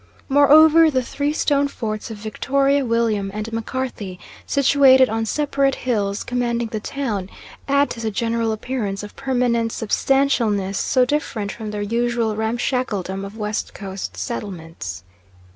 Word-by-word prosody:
Moreover, 310 +3 +7
the 260 -4 0
three 285 +4 -2
stone 285 -2 +1
forts 215 -5 -5
of 220 - -7
Victoria, 275 +6 +1
William, 230 -4 0
and 215 +2 -5
Macarthy, 225 -5 -4 0.3
situated 270 -2 +5
on 225 0 -1
separate 275 0 +1
hills 205 -5 -1
commanding 235 -2 -1
the 220 - -3
town, 210 -6 -3 0.4
add 280 +1 +2
to 230 - -6
the 225 -1 -1
general 230 +1 -1
appearance 215 -3 -3
of 205 - -10
permanent 245 -3 0
substantialness 225 -5 +1
so 255 -1 +2
different 240 -7 -2
from 220 -2 -7
the 205 0 -3
usual 235 0 0
ramshackledom 220 -4 -2
of 200 +2 -8
West 210 0 -3
Coast 190 - -6
settlements. 115 - -6
230 Hz, 135 wpm, -21 LUFS, 210-265 Hz, 0.4 s, Moreover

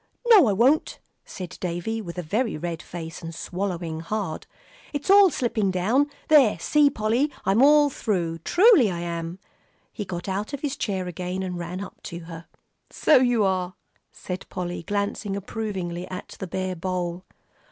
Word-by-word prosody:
"No, 405 - +8
I 205 - +2
won't," 255 +10 +2 0.3
said 180 -3 -8
Davie, 180 +6 -2
with 175 -3 -8
a 180 - -3
very 215 +5 -1
red 165 +1 -4
face, 165 -1 -8
and 165 -1 -7
swallowing 175 -3 -4
hard, 180 -1 -4 0.5
"it's 290 +6 0
all 400 -1 +8
slipping 235 - 0
down. 220 +11 +2 0.2
There, 275 - +6
see, 290 - +3
Polly. 240 +4 0
I'm 195 +5 +3
all 290 +1 +6
through; 170 -9 -2
truly 350 - +5
I 175 -2 -3
am." 170 0 -4 0.6
He 210 - -4
got 175 -2 -6
out 200 +7 -3
of 285 - -4
his 290 -2 -2
chair 190 -7 -2
again, 180 +2 -4
and 180 -1 -4
ran 175 +2 -5
up 200 - -9
to 170 0 -6
her. 165 0 -10 0.4
"So 310 - +4
you 245 -4 +3
are," 185 -1 0 0.4
said 180 0 -7
Polly, 175 -2 -4
glancing 200 +2 -2
approvingly 190 -4 -4
at 185 +1 -7
the 190 - -4
bare 185 +1 -3
bowl. 180 0 -3
190 Hz, 165 wpm, -25 LUFS, 175-230 Hz, 0.6 s, No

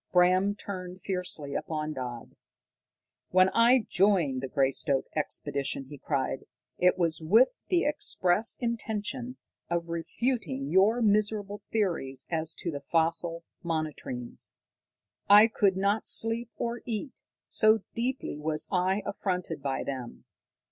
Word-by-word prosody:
Bram 185 +3 +4
turned 185 -3 -7
fiercely 180 -7 -3
upon 155 -1 -3
Dodd. 125 -4 -7 0.9
"When 185 +1 +5
I 230 +3 +4
joined 175 -9 +2
the 135 - -3
Greystoke 135 0 +1
expedition," 140 -2 -2
he 145 -2 -10
cried, 135 -2 -2 0.3
"it 180 0 +4
was 165 -3 0
with 220 +11 +5 0.2
the 355 -2 +2
express 220 -8 +2
intention 235 +1 -3 0.3
of 170 0 -2
refuting 165 - -2
your 210 +6 +4
miserable 205 -1 +1
theories 170 -11 -1
as 160 -1 -1
to 170 - -4
the 140 -2 -6
fossil 165 +2 0 0.2
monotremes. 155 -7 -4 0.8
I 205 +2 +9
could 200 -4 +2
not 200 +3 +1
sleep 225 +1 +2
or 235 0 -3
eat, 235 +4 -4 0.3
so 215 -1 +4
deeply 245 - -3
was 155 0 -2
I 190 +2 +1
affronted 180 -4 -3
by 135 -1 -2
them. 130 -3 -6
180 Hz, 120 wpm, -28 LUFS, 155-215 Hz, 0.9 s, I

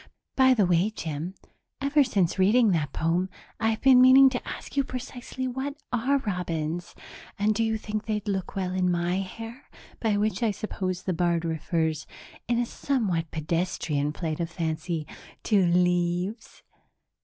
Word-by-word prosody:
By 260 -1 +5
the 210 -5 +3
way, 175 +3 +3
Jim, 165 -3 -5 0.4
ever 280 +2 +3
since 195 -8 0
reading 215 +3 +5
that 155 -4 0
poem, 170 +4 0 0.3
I've 225 0 0
been 260 -2 +7
meaning 260 +1 +8
to 245 - -4
ask - - -7
you 280 - +3
precisely 255 0 -5
what 265 +3 -3 0.2
are 255 +4 +2
robins 175 - -3 0.4
and 210 +2 +2
do 225 +2 0
you 220 0 0
think 215 0 -5
they'd 210 -1 -2
look 190 -3 -2
well 185 -2 -1
in 185 -1 +1
my 175 +1 0
hair, 225 +7 -8 0.3
by 215 -3 +1
which, 215 +3 0
I 230 - +3
suppose 185 -3 -3
the 185 - -1
bard 170 0 +1
refers, 160 -1 -1 0.4
in 235 0 +1
a 240 - +1
somewhat 200 - -1
pedestrian 155 -2 -1
flight 155 0 -4
of 170 -1 -2
fancy, 160 -1 -3 0.4
to 200 -5 +3
leaves?" 180 +4 0
190 Hz, 155 wpm, -27 LUFS, 170-230 Hz, 0.4 s, meaning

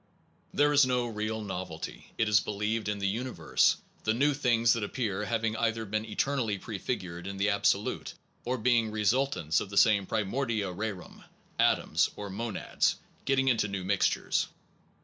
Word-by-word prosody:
There 145 0 +3
is 145 0 +7
no 125 -1 +1
real 110 -1 -3
novelty, 90 -5 -6
it 110 - +2
is 105 0 +5
believed, 105 +1 -2
in 105 - -1
the 100 -1 -1
universe, 105 -5 +1
Unity - - -30
of - - -31
the 110 - +3
new 145 +4 +3
things 120 -5 +3
that 115 - -2
appear 105 -2 -2
having 110 -1 -1
either 115 0 0
been 110 +1 -2
eternally 115 -1 -1
prefigured 95 -4 -5
in 100 0 -5
the 100 +2 +2
absolute, 100 - 0 0.3
or 125 +2 -1
being 115 -1 +2
results 105 - +1
of 100 - -5
the 100 - -5
same 100 -3 +5
pri 110 -1 0
mordia 110 -3 -1
rerum, 100 -2 -6 0.4
atoms, - - +3
or 100 -1 -6
monads, 110 +2 -1 0.3
getting 135 -1 +2
into 115 -5 +3
new 100 -2 -4
mixtures. 100 +1 +1
110 Hz, 170 wpm, -29 LUFS, 100-120 Hz, 0.4 s, is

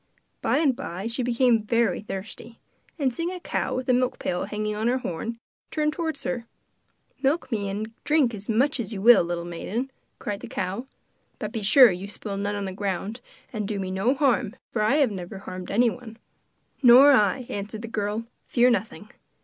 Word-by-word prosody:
By - - +2
and 290 -5 +3
by 175 0 -6
she 230 +3 -1
became 245 -1 +3
very 230 +2 +1
thirsty, 215 +3 -8 0.4
and 270 -5 0
seeing 335 +6 -2
a 365 0 -5
cow - - -2
with 255 0 -3
a 255 - +4
milk 250 0 +1
pail 180 - -2
hanging 210 0 -3
on 220 +2 -1
her 250 +2 +2
horn, 230 +1 -4 0.3
turned 300 -1 0
towards 320 -3 -3
her. 240 -3 -3 0.7
'Milk 275 0 0
me 205 -3 -1
and 215 +3 -4
drink 290 -5 +3
as 205 0 -8
much 270 +6 +2
as 225 -2 -4
you 205 - -4
will, 225 -1 +7
little 170 0 -3
maiden,' 215 +10 -4 0.3
cried 205 -1 -4
the - - -8
cow, 195 +8 -3 0.5
'but - - -5
be 225 - -3
sure 225 +3 +7
you 180 +2 -5
spill 205 0 -6
none 205 +1 -2
on 200 -1 -3
the 190 - -4
ground; 200 +4 -3 0.3
and 210 -3 -2
do 205 -1 -3
me 190 -1 -3
no 200 +8 +1
harm, 260 -6 +1 0.2
for 215 - -1
I 215 +6 +3
have 280 -6 +3
never 190 0 -6
harmed 185 -2 -8
anyone.' 230 +1 0 0.6
'Nor 260 +3 +9
I,' 225 -1 +3
answered 210 +2 -5
the - - -5
girl; 215 0 -2 0.2
'fear 250 0 +4
nothing. 215 +1 -3
225 Hz, 195 wpm, -25 LUFS, 200-255 Hz, 0.7 s, Nor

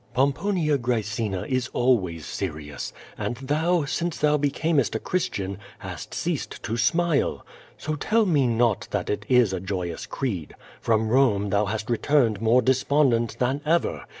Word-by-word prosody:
Pomponia 150 +3 +1
Graecina 110 -5 -2
is 130 -1 0
always 95 - +1
serious, 75 -3 -5 0.3
and - - -2
thou, 155 +5 +1
since 170 +3 -2
thou 150 0 +3
becamest 145 - +1
a - - 0
Christian, 100 - -2 0.2
hast - - -8
ceased - - -3
to 110 - -2
smile. 165 +5 +1 0.3
So 155 - -3
tell 215 +9 +2
me 145 -8 +3
not 115 -2 +1
that - - -2
it 105 0 -4
is 125 -6 +4
a 95 - -1
joyous 90 -3 -4
creed. 100 - -4 0.3
From 110 -1 +1
Rome 110 -6 +3
thou 100 +1 +2
hast 110 +1 -3
re 120 -2 0
turned 120 -8 +2
more 115 +3 +4
despondent 130 -3 +2
than 130 +3 0
ever. 165 +3 0
125 Hz, 150 wpm, -25 LUFS, 105-145 Hz, 0.3 s, is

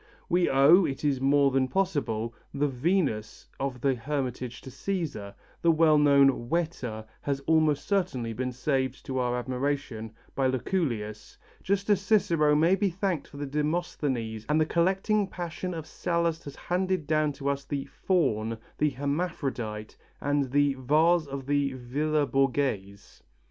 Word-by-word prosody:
"We 175 0 +3
owe, 140 +8 +6
it 145 -2 -3
is 135 -3 +1
more 140 0 +4
than 130 0 +2
possible, 130 - -1 0.2
the 145 +1 +2
Venus 135 - -1
of 135 -3 -3
the 135 0 +3
Hermitage 125 -1 -3
to 130 - -10
Cæsar; 145 - -4 0.3
the 170 - +5
well 155 -1 +5
known 140 -4 +4
'Whetter' 130 -10 -2 0.2
has 140 -1 -1
almost 155 -1 +2
certainly 175 - 0
been 125 +2 -2
saved 130 0 -1
to 130 -2 -2
our 125 -1 0
admiration 125 -3 -3 0.2
by 135 -1 +1
Lucullus, 120 - -2 0.2
just 200 +1 -1
as 195 -2 +3
Cicero 170 -8 +3
may 165 +4 +4
be 195 0 +2
thanked 185 -3 -2
for 145 - -13
the 145 - -3
'Demosthenes' 145 -7 -2
and 150 +1 +3
the 155 - +3
collecting 190 +5 +1
passion 180 0 -5
of 160 -2 -5
Sallust 170 -1 -1
has 140 - -8
handed 185 -2 -1
down 155 0 +1
to 140 0 -6
us 140 0 0
the 140 -2 -3
'Faun,' 115 - 0 0.2
the 150 - +3
'Hermaphrodite' 135 -7 -3 0.2
and 145 -2 0
the 145 0 +3
'Vase' 155 +5 +3
of 135 -1 -6
the 140 -1 +1
Villa 145 +4 0
Borghese." 125 -7 -1
145 Hz, 150 wpm, -28 LUFS, 130-165 Hz, 0.3 s, owe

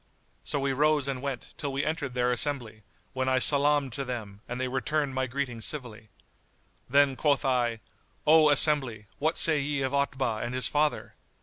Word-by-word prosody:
So 145 - -2
we 135 0 -1
rose 150 0 +1
and 135 -2 -4
went, 135 -3 -6
till 145 -2 -4
we 135 +1 -3
entered 145 -5 -4
their 125 0 0
assembly, 120 -4 0 0.3
when 130 0 -2
I 130 - +1
salam'd 140 -1 +5
to 140 - -4
them 110 -6 -7
and 125 +1 -5
they 130 - -2
returned 140 +2 -2
my 130 0 -2
greeting 125 -3 -5
civilly. 115 -5 -4 0.8
Then 140 0 +3
quoth 145 0 0
I, 120 -4 -1 0.4
"O 155 0 +5
assembly, 135 -7 +4
what 155 +3 -1
say 155 -2 +3
ye 140 -1 -2
of 130 +1 -3
Otbah 130 -5 -2
and 120 +2 -5
his 130 - +3
father?" 150 0 -1
135 Hz, 180 wpm, -27 LUFS, 125-145 Hz, 0.8 s, salam'd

